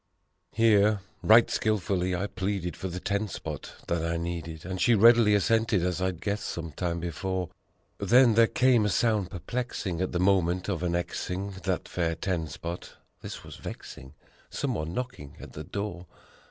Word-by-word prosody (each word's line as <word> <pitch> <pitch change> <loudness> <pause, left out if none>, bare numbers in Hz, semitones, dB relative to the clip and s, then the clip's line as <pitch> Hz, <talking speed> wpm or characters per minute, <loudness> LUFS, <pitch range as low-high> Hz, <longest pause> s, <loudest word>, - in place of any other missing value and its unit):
Here, 105 -2 +4 0.2
right 115 +2 +7
skillfully 95 -4 0
I 90 +3 -1
pleaded 95 -2 -3
for 95 - -5
the 90 0 -5
ten 100 +3 -1
spot 80 -6 -6
that 85 -1 0
I 85 0 -1
needed, 85 -1 -5
And 95 0 -4
she 120 - +5
readily 115 0 +6
assented, 110 -2 +2
as 90 0 -1
I'd 95 -2 -1
guessed 105 0 -2
some 85 -2 -5
time 85 +1 -2
before. 90 +2 -3 0.5
Then 125 -1 +5
there 115 +1 +6
came 125 -2 +3
a 105 - +1
sound 105 -1 +1
perplexing, 95 -2 -3
at 95 - -1
the 90 - -1
moment 90 -1 +2
of 90 -4 -1
annexing 90 +2 -2
That 95 -2 -1
fair 85 -2 -1
ten 85 -3 -2
spot: 85 +4 -7 0.3
this - - -7
was - - -10
vexing! 65 0 -9 0.3
Someone 80 +1 -2
knocking 125 - -5
at - - -11
the 75 - -6
door! 90 +1 -5
95 Hz, 165 wpm, -28 LUFS, 85-105 Hz, 0.5 s, right